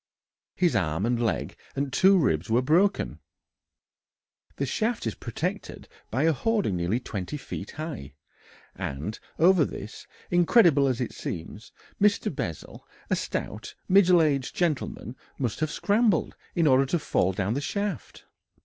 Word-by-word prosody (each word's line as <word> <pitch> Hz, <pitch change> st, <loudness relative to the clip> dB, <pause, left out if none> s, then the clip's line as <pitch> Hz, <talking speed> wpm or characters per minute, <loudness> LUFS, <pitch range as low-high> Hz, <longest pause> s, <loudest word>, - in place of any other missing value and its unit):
His 175 Hz, -8 st, +2 dB
arm 90 Hz, 0 st, 0 dB
and 120 Hz, 0 st, 0 dB
leg 115 Hz, -, -1 dB, 0.2 s
and 140 Hz, -1 st, -2 dB
two 190 Hz, +1 st, +5 dB
ribs 90 Hz, -, +1 dB
were 120 Hz, +3 st, +3 dB
broken. 175 Hz, +9 st, +2 dB, 1.4 s
The -, -, -1 dB
shaft 225 Hz, -, -1 dB
is 115 Hz, -, -1 dB
protected -, -, -5 dB, 0.2 s
by 130 Hz, +5 st, 0 dB
a 165 Hz, 0 st, +4 dB
hoarding 205 Hz, -, 0 dB
nearly 90 Hz, +7 st, 0 dB
20 105 Hz, +2 st, -5 dB
feet -, -, -7 dB
high, 145 Hz, -, -7 dB, 0.6 s
and 75 Hz, +11 st, -5 dB, 0.2 s
over 175 Hz, 0 st, +5 dB
this, 110 Hz, -5 st, -7 dB, 0.2 s
incredible 175 Hz, -, +5 dB
as 130 Hz, -2 st, -1 dB
it 120 Hz, -, -2 dB
seems, 95 Hz, +7 st, -7 dB, 0.3 s
Mr. 205 Hz, -7 st, +2 dB
Bessel, 85 Hz, -, -6 dB, 0.2 s
a -, -, +4 dB
stout, 105 Hz, +3 st, -4 dB
middle 185 Hz, -3 st, +6 dB
aged 140 Hz, -4 st, 0 dB
gentleman, 150 Hz, -7 st, -2 dB, 0.2 s
must 125 Hz, -5 st, -2 dB
have 155 Hz, -1 st, 0 dB
scrambled 205 Hz, 0 st, +1 dB, 0.2 s
in 170 Hz, -, +2 dB
order 135 Hz, -1 st, +4 dB
to 175 Hz, -, +1 dB
fall 95 Hz, -, +1 dB
down 95 Hz, +3 st, -1 dB
the 140 Hz, -, -2 dB
shaft. 200 Hz, -, -4 dB
140 Hz, 140 wpm, -26 LUFS, 110-175 Hz, 1.4 s, middle